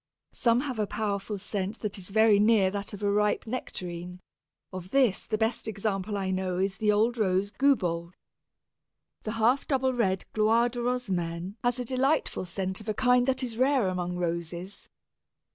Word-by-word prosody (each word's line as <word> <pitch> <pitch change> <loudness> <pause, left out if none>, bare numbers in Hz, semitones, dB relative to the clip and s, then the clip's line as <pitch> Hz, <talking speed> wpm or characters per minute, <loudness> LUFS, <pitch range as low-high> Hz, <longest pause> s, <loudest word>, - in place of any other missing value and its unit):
Some 235 +1 +2
have 260 -5 -4
a 210 - +1
powerful 205 -1 -2
scent 200 +1 -4
that 210 -2 -3
is 180 - -8
very 220 0 +5
near 210 -3 +4
that 200 0 -4
of 205 0 -8
a 200 - +2
ripe 210 0 +1
Nectarine; 180 -6 -5 0.5
of 185 -1 -7
this 255 -5 +2
the 215 - 0
best 225 +1 -1
example 205 -1 -2
I 190 -1 -1
know 185 -1 -1
is 195 +1 -1
the 210 -1 +2
old 225 +3 +2
rose 195 0 +1
Goubault. 180 -11 +1 1.1
The 215 - -4
half 230 +4 +2
double 265 -2 +1
red 190 -6 0
Gloire 225 +3 +3
de 245 0 -6
Rosamène 190 -8 -2
has 245 0 +1
a 250 - -3
delightful 265 -2 0
scent 190 +2 -3
of 215 - -7
a 215 - -1
kind 250 +1 +3
that 260 0 +1
is 235 -2 -5
rare 260 -5 +3
among 180 -1 -2
Roses. 175 +2 -4
210 Hz, 175 wpm, -28 LUFS, 185-240 Hz, 1.1 s, very